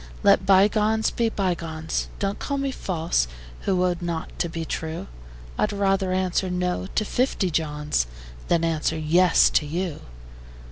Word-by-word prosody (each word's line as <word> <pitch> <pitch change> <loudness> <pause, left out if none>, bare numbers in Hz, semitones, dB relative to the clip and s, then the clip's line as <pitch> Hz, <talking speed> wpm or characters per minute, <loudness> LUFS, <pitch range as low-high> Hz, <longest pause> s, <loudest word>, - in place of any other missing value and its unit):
Let 190 - +4
bygones 210 +3 +4
be 230 -1 +1
bygones: 170 -6 -2
Don't 200 0 -2
call 280 - -2
me 275 0 -1
false, 165 - -1 0.4
who 185 -1 +3
owed 180 -1 -1
not 170 -2 -3
to 170 - 0
be 165 0 -4
true: 160 +1 -4 0.5
I'd - - +2
rather 195 -2 +1
answer 185 0 0
"No" 180 +1 -1
to 215 - +1
fifty 220 -6 0
Johns 150 - 0 0.4
Than 170 -1 +2
answer 160 -1 0
"Yes" 165 +3 +4
to 150 - +2
you. 170 0 -3
180 Hz, 145 wpm, -24 LUFS, 160-195 Hz, 0.5 s, Let